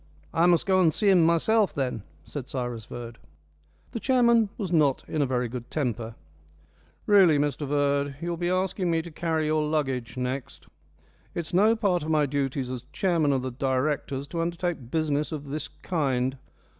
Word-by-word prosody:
"I 170 +2 +4
must 175 -2 +3
go 190 -1 +3
and 165 -3 +4
see 200 +4 +2
him 180 -3 +5
myself 190 +6 +3
then," 125 -5 -2 0.2
said 135 -4 -6
Cyrus 120 -4 -4
Verd. 120 -1 -8 0.7
The 230 - -4
chairman 235 -4 +3
was 190 -5 -3
not 150 -5 +2
in 155 - -1
a 140 - +2
very 125 -1 0
good 120 0 -7
temper. 120 -6 -2 0.9
"Really, 190 -7 +6
Mr 145 0 -1
Verd, 140 0 +1
you'll 170 +1 -3
be 175 +1 -2
asking 185 0 0
me 165 -1 +1
to 170 - -9
carry 160 0 -1
your 155 0 +1
luggage 135 -6 -2
next. 125 +1 -4 0.7
It's 170 -1 -4
no 210 +5 +5
part 200 -6 +1
of 155 - -5
my 155 -2 +3
duties 135 -2 -2
as 125 -1 -6
chairman 170 -6 +1
of 130 -2 0
the 130 - -3
directors 135 +2 -1
to 170 - -2
undertake 170 -6 -3
business 150 0 0
of 145 -3 -6
this 150 +1 -4
kind. 135 -8 -1
150 Hz, 175 wpm, -26 LUFS, 130-175 Hz, 0.9 s, Really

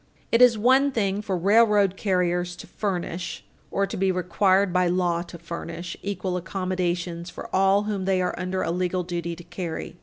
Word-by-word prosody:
It 230 - +4
is 245 -3 +7
one 260 +5 +4
thing 200 -4 0
for 195 -3 -2
railroad 205 0 +4
carriers 180 -3 0
to - - -10
furnish, 180 -3 -4 0.2
or 200 - +1
to 195 - -6
be 190 0 +2
required 185 +1 +2
by 180 0 +3
law 175 -1 +1
to 170 0 -9
furnish, 170 +1 -6
equal 190 -2 -2
accommodations 180 -2 -2
for - - -7
all 195 +2 +4
whom 205 -3 -2
they 190 -1 +2
are 180 0 0
under 185 +1 -2
a 165 - -1
legal 180 +1 -1
duty 170 -1 -4
to 175 - -12
carry. 175 -1 -6
185 Hz, 180 wpm, -25 LUFS, 175-200 Hz, 0.2 s, is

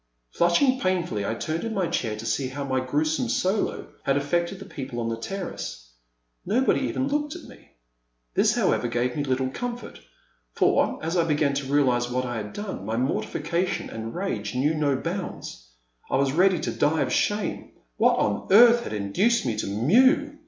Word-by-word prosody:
Flushing 255 +11 +3
painfully, 180 - -1
I 110 - -1
turned 160 +7 -3
in 225 -1 -3
my 190 -2 +1
chair 110 -9 -2
to 110 - -7
see 115 +4 0
how 140 +2 -5
my 130 -1 0
gruesome 155 - 0
solo 215 -5 -1
had 135 -1 +1
affected 170 +6 -1
the 195 - -10
people 135 -9 -6
on 115 -1 -2
the 115 - -1
terrace. 115 - -6 0.5
Nobody 250 +9 +2
even 265 - -1
looked 295 +2 -1
at 350 - -9
me. - - -16 0.6
This, - - +3
however, 120 - +1
gave 120 +1 -1
me 145 - -1
little 130 -1 -1
comfort, 245 - -6 0.5
for, - - +2
as 165 +3 -1
I 170 - +3
began 150 -3 +1
to 140 -1 -3
realize 125 -4 +2
what 125 +1 -1
I 120 -2 -3
had 105 -1 -5
done, 205 - -6
my 110 +3 -2
mortification 165 +7 -1
and 115 0 -6
rage 120 - -3
knew 145 +5 +2
no 150 -3 +1
bounds. 165 - -5 0.4
I - - 0
was 135 0 +2
ready 180 +3 +3
to - - -2
die 150 +2 +1
of 125 - -2
shame. 205 -1 -1 0.3
What - - +4
on 105 -1 0
earth 235 +3 +7
had - - -5
induced 105 - +1
me 115 -3 0
to - - -2
mew 255 - +3
145 Hz, 185 wpm, -25 LUFS, 125-195 Hz, 0.6 s, earth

